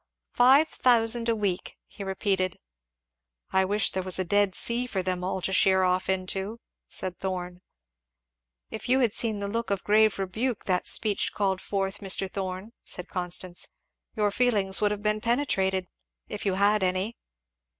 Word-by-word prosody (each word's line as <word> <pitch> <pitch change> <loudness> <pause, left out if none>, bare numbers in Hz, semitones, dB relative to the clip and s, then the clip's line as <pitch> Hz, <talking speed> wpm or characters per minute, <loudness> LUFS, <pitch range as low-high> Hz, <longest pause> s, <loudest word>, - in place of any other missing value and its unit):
"Five 265 +6 +6
thousand 235 -3 +2
a 230 - +2
week!" 195 -4 -2
he 200 - -10
repeated. 190 -1 -1 0.9
"I 190 0 +3
wish 205 +2 +1
there 190 - -2
was 185 -1 -1
a 185 - 0
Dead 205 0 +2
Sea 240 +1 0
for 190 -6 -2
them 180 -1 -2
all 185 0 -3
to 190 - -1
sheer 190 0 +4
off 185 +1 +1
into!" 190 +4 -2 0.3
said 180 -1 -3
Thorn. 180 -1 -4 1.1
"If 220 +2 -6
you 260 +1 +4
had 230 -4 +2
seen 220 -3 -1
the 200 - -2
look 230 +3 -3
of 200 -1 -1
grave 215 0 +4
rebuke 215 +5 -2
that 180 -2 0
speech 210 -2 +2
called 190 -2 0
forth, 195 0 -2
Mr. 195 -1 +1
Thorn," 190 +2 -5
said 180 +1 -5
Constance, 180 0 -1 0.5
"your 210 -2 +1
feelings 205 -5 +2
would 210 - +3
have 205 0 -4
been 210 0 +1
penetrated 195 -7 0 0.4
if 210 -1 -5
you 190 - +1
have 205 +2 +3
any." 185 +5 0
195 Hz, 165 wpm, -27 LUFS, 185-215 Hz, 1.1 s, Five